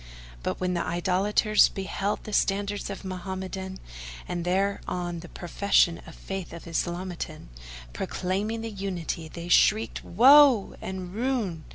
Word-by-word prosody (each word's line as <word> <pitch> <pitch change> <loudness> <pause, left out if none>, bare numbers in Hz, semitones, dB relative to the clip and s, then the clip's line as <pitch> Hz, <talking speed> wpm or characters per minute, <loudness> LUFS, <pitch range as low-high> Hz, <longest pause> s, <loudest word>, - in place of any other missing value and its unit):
But - - -3
when 180 0 0
the 170 - 0
Idolaters 195 +5 +3
beheld 195 +1 -3
the 215 - -7
standards 200 +1 0
Mohammedan 190 0 -5 0.5
and 175 -1 -3
there 195 +3 0
on 175 -1 -3
the 175 0 -10
profession 175 -1 +2
of 165 - -11
Faith 195 -3 -6
Islamitan, 175 - -4 0.4
proclaiming 200 - -2
the 225 0 -5
Unity, 185 -5 -4
they 170 +2 -8
shrieked 215 +5 +3
"Woe!" 260 +1 +6
and 185 -1 -6
"Ruin!" 220 -9 -2
190 Hz, 125 wpm, -27 LUFS, 175-205 Hz, 0.5 s, Woe